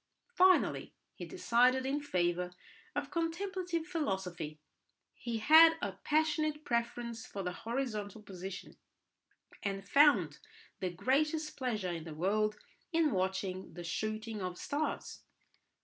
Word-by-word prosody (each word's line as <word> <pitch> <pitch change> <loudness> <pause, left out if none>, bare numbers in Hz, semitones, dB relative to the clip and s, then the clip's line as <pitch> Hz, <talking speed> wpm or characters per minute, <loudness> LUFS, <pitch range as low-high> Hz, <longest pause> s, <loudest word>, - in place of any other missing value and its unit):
Finally 370 -4 +3 0.2
he - - -7
decided 255 -6 +3
in 280 +2 0
favour 180 -8 0 0.5
of - - -2
contemplative 345 0 -2
philosophy. 190 - -3 0.5
He 235 -2 -4
had 320 +8 +8
a 200 - -2
passionate 305 +7 0
preference 235 -1 -2
for 195 - -5
the 180 - -2
horizontal 220 -2 -4
position, 190 -1 -8 0.8
and 195 -1 -3
found 220 - +5 0.4
the 185 - -1
greatest 305 - 0
pleasure 215 -9 -2
in 165 -2 -5
the 160 -2 -7
world 210 +5 +1 0.3
in 325 -3 +3
watching 190 -1 -2
the 175 - -6
shooting 215 +4 -3
of 180 -1 -4
stars. 300 +2 -3
230 Hz, 115 wpm, -33 LUFS, 190-305 Hz, 0.8 s, had